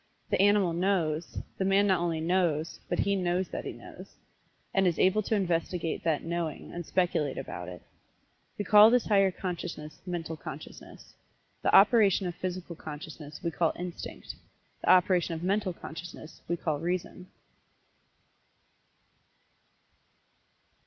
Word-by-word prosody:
The -, -, +3 dB
animal 200 Hz, -3 st, +4 dB
"knows" 170 Hz, -3 st, 0 dB, 0.2 s
the -, -, +1 dB
man 195 Hz, +1 st, +3 dB
not 190 Hz, -3 st, +3 dB
only 170 Hz, -2 st, -1 dB
"knows," 165 Hz, -2 st, 0 dB
but -, -, 0 dB
he 200 Hz, -, +1 dB
"knows 180 Hz, 0 st, 0 dB
that -, -, -5 dB
he -, -, -3 dB
knows," -, -, -12 dB, 0.6 s
and 195 Hz, -1 st, +3 dB
is 170 Hz, -, +1 dB
able 190 Hz, +3 st, +3 dB
to 220 Hz, -, -1 dB
investigate 170 Hz, -3 st, -1 dB
that 160 Hz, -3 st, 0 dB
"knowing" 165 Hz, -2 st, -4 dB
and 175 Hz, -, -5 dB
speculate 170 Hz, -4 st, 0 dB
about 90 Hz, -9 st, -6 dB
it. 90 Hz, -1 st, -10 dB, 0.7 s
We 205 Hz, -, -3 dB
call 210 Hz, +2 st, +8 dB
this 245 Hz, 0 st, +3 dB
higher 195 Hz, -2 st, +4 dB
consciousness 175 Hz, -5 st, -6 dB
Mental 165 Hz, -2 st, -4 dB
Consciousness. 155 Hz, -, -10 dB, 0.5 s
The -, -, +3 dB
operation 200 Hz, -2 st, +6 dB
of 175 Hz, -, -2 dB
Physical 180 Hz, -1 st, -5 dB
Consciousness 150 Hz, -1 st, -9 dB
we 170 Hz, -, -1 dB
call 165 Hz, -1 st, +1 dB
Instinct 180 Hz, -1 st, -7 dB, 0.5 s
the -, -, -1 dB
operation 180 Hz, -2 st, +4 dB
of 160 Hz, -, -6 dB
Mental 195 Hz, +1 st, 0 dB
Consciousness 165 Hz, -1 st, -10 dB
we 170 Hz, -, -1 dB
call 155 Hz, -3 st, -2 dB
Reason. 180 Hz, +2 st, -3 dB
175 Hz, 140 wpm, -29 LUFS, 165-190 Hz, 0.7 s, call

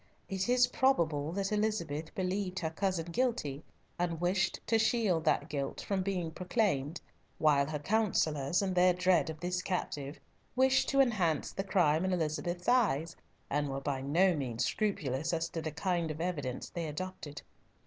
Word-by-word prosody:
It 190 Hz, +2 st, -2 dB
is 250 Hz, 0 st, +5 dB
probable 165 Hz, -, +1 dB
that 195 Hz, +1 st, -2 dB
Elizabeth 170 Hz, -8 st, -1 dB
believed 185 Hz, 0 st, -2 dB
her 160 Hz, -3 st, -2 dB
cousin 185 Hz, -1 st, -1 dB
guilty, 170 Hz, -, -1 dB, 0.4 s
and 170 Hz, -2 st, -1 dB
wished 180 Hz, 0 st, +1 dB
to 225 Hz, 0 st, +2 dB
shield 220 Hz, -7 st, +2 dB
that 150 Hz, -1 st, +2 dB
guilt 140 Hz, -3 st, -3 dB
from 195 Hz, -2 st, -1 dB
being 185 Hz, -4 st, -2 dB
proclaimed, 180 Hz, -, 0 dB, 0.4 s
while 145 Hz, -3 st, +3 dB
her 155 Hz, 0 st, -2 dB
councillors, 165 Hz, -4 st, +1 dB
in 190 Hz, -1 st, -1 dB
their 180 Hz, 0 st, +5 dB
dread 180 Hz, -1 st, +2 dB
of 160 Hz, -1 st, -6 dB
the 175 Hz, +2 st, -3 dB
captive, 145 Hz, -6 st, -3 dB, 0.4 s
wished 265 Hz, +1 st, +3 dB
to 275 Hz, 0 st, +4 dB
enhance 185 Hz, -, +1 dB
the 195 Hz, -, -3 dB
crime 175 Hz, -5 st, +2 dB
in 190 Hz, 0 st, 0 dB
Elizabeth's 175 Hz, +1 st, -2 dB
eyes, 170 Hz, -, +2 dB, 0.3 s
and 145 Hz, 0 st, -1 dB
were 135 Hz, 0 st, -3 dB
by 135 Hz, -1 st, -2 dB
no 170 Hz, +7 st, +3 dB
means 125 Hz, -5 st, -2 dB
scrupulous 160 Hz, -, -1 dB
as 165 Hz, 0 st, -1 dB
to 165 Hz, -, -4 dB
the 155 Hz, -, -3 dB
kind 170 Hz, +1 st, -1 dB
of 155 Hz, 0 st, -5 dB
evidence 145 Hz, -8 st, -3 dB
they 170 Hz, -2 st, -3 dB
adduced. 155 Hz, -2 st, -6 dB
175 Hz, 165 wpm, -32 LUFS, 150-195 Hz, 0.4 s, is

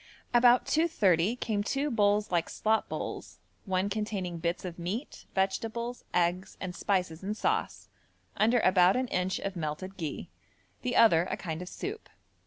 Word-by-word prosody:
About 240 Hz, +1 st, +6 dB
2.30 225 Hz, -, +2 dB
came 210 Hz, -3 st, -1 dB
two 280 Hz, +6 st, -1 dB
bowls 205 Hz, -2 st, +2 dB
like 170 Hz, -2 st, +1 dB
slop 220 Hz, 0 st, 0 dB
bowls, -, -, -5 dB, 0.3 s
one 190 Hz, 0 st, 0 dB
containing 200 Hz, -4 st, -3 dB
bits 170 Hz, +2 st, -2 dB
of 175 Hz, -1 st, -6 dB
meat, 200 Hz, -, -5 dB
vegetables, 225 Hz, +5 st, -1 dB
eggs 180 Hz, +2 st, 0 dB
and 180 Hz, -2 st, -5 dB
spices 180 Hz, -5 st, -1 dB
in 205 Hz, +2 st, -2 dB
sauce, 430 Hz, -, -1 dB, 0.5 s
under 225 Hz, +4 st, +3 dB
about 185 Hz, 0 st, +5 dB
an 255 Hz, 0 st, 0 dB
inch 180 Hz, +1 st, 0 dB
of 195 Hz, -1 st, -4 dB
melted 170 Hz, +4 st, -4 dB
ghi, 160 Hz, -5 st, -5 dB, 0.5 s
the 250 Hz, -1 st, -2 dB
other 175 Hz, -6 st, +5 dB
a -, -, -2 dB
kind 160 Hz, -2 st, -5 dB
of 180 Hz, -, -6 dB
soup. 425 Hz, +3 st, -6 dB
195 Hz, 155 wpm, -29 LUFS, 180-230 Hz, 0.5 s, About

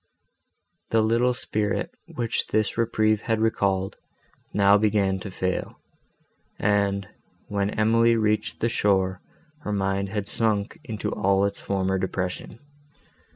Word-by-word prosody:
The 115 Hz, -1 st, +3 dB
little 120 Hz, +3 st, +2 dB
spirit, 105 Hz, -3 st, -1 dB, 0.2 s
which 115 Hz, -2 st, -1 dB
this 110 Hz, -1 st, 0 dB
reprieve 110 Hz, -2 st, +2 dB
had 115 Hz, -1 st, 0 dB
recalled, 100 Hz, -4 st, 0 dB, 0.5 s
now 100 Hz, 0 st, +5 dB
began 100 Hz, -2 st, +2 dB
to 95 Hz, -, -7 dB
fail, 95 Hz, 0 st, -2 dB, 0.8 s
and, 100 Hz, -2 st, +1 dB, 0.4 s
when 100 Hz, -1 st, 0 dB
Emily 115 Hz, +2 st, +3 dB
reached 105 Hz, -1 st, 0 dB
the 115 Hz, -, +3 dB
shore, 95 Hz, -4 st, +1 dB, 0.4 s
her 105 Hz, -, -5 dB
mind 95 Hz, -1 st, 0 dB
had 105 Hz, 0 st, -3 dB
sunk 110 Hz, -2 st, -1 dB
into 110 Hz, -4 st, -3 dB
all 100 Hz, +1 st, +2 dB
its 100 Hz, 0 st, -3 dB
former 95 Hz, -1 st, 0 dB
depression. 95 Hz, +2 st, -3 dB
105 Hz, 120 wpm, -25 LUFS, 95-110 Hz, 0.8 s, now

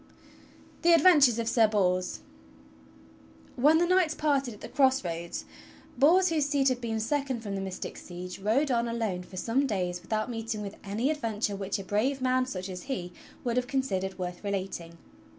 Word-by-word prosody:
THE 340 Hz, 0 st, +5 dB
ADVENTURES 295 Hz, -8 st, +6 dB
OF 230 Hz, -1 st, -2 dB
SIR 225 Hz, -1 st, +4 dB
BORS 185 Hz, -3 st, 0 dB, 1.3 s
When 295 Hz, +5 st, +5 dB
the 345 Hz, -, +3 dB
knights 360 Hz, -3 st, +3 dB
parted 275 Hz, -4 st, +1 dB
at -, -, -18 dB
the -, -, -6 dB
cross 265 Hz, -5 st, +2 dB
roads, 170 Hz, 0 st, -4 dB, 0.5 s
Bors 345 Hz, +8 st, +5 dB
whose 310 Hz, -3 st, +1 dB
seat 280 Hz, -2 st, +2 dB
had 250 Hz, -1 st, -2 dB
been 225 Hz, -2 st, -2 dB
second 265 Hz, +1 st, -1 dB
from 205 Hz, -3 st, -5 dB
the 195 Hz, -, -2 dB
mystic 190 Hz, -1 st, -5 dB
Siege 180 Hz, +1 st, -8 dB
rode 245 Hz, +9 st, +1 dB
on 235 Hz, -1 st, +1 dB
alone 225 Hz, -6 st, -2 dB
for 185 Hz, +1 st, -11 dB
some 255 Hz, +8 st, +1 dB
days 180 Hz, -5 st, -2 dB
with 175 Hz, -, -18 dB
out 215 Hz, +1 st, 0 dB
meeting 225 Hz, -2 st, -4 dB
with 200 Hz, 0 st, -6 dB
any 220 Hz, +8 st, 0 dB
adventure 220 Hz, -8 st, -2 dB
which 195 Hz, 0 st, -3 dB
a 195 Hz, -, -6 dB
brave 220 Hz, +8 st, 0 dB
man, 255 Hz, 0 st, +1 dB
such 185 Hz, -6 st, -5 dB
as 180 Hz, -1 st, -6 dB
he, 180 Hz, -9 st, -4 dB, 0.3 s
would 240 Hz, -1 st, -1 dB
have 250 Hz, 0 st, 0 dB
considered 195 Hz, -9 st, -1 dB
worth 180 Hz, 0 st, -5 dB
relating. 190 Hz, -4 st, -4 dB
225 Hz, 185 wpm, -28 LUFS, 195-270 Hz, 1.3 s, ADVENTURES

